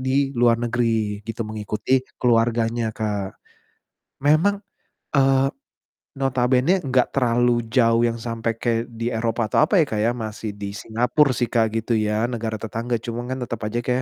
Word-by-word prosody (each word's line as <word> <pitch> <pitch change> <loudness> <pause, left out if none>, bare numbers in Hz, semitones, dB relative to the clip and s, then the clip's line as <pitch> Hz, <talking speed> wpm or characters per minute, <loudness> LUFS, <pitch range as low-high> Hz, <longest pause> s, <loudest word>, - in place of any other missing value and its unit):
di 135 +1 +1
luar 120 -1 +4
negeri 115 -3 0
gitu, 115 +1 -4
mengikuti 110 +4 0 0.2
keluarganya, 115 -1 +2
Kak. 105 -3 -3 0.9
Memang, 165 +8 +3 0.5
eee, 135 0 +4 0.7
notabene 135 +6 +2
gak 130 -2 +2
terlalu 120 -2 +2
jauh 115 -2 +3
yang 115 - -2
sampai 115 -1 -2
kayak 115 0 0
di 115 +1 -2
Eropa 115 0 -1
atau - - +3
apa 190 +3 +2
ya, - - +3
Kak, 110 - -2
ya, 115 - +3
masih 110 -2 -5
di 100 -1 -5
Singapore 125 +7 +1
sih, 120 +1 -1
Kak, 115 -2 +3
gitu 115 +1 -1
ya, 105 +1 0
negara 115 -2 -3
tetangga, 115 +2 -3
cuman 120 +1 -5
kan 130 - -2
tetep 120 -2 -5
aja, 105 +3 -2
Kak, 125 0 0
115 Hz, 160 wpm, -22 LUFS, 115-125 Hz, 0.9 s, luar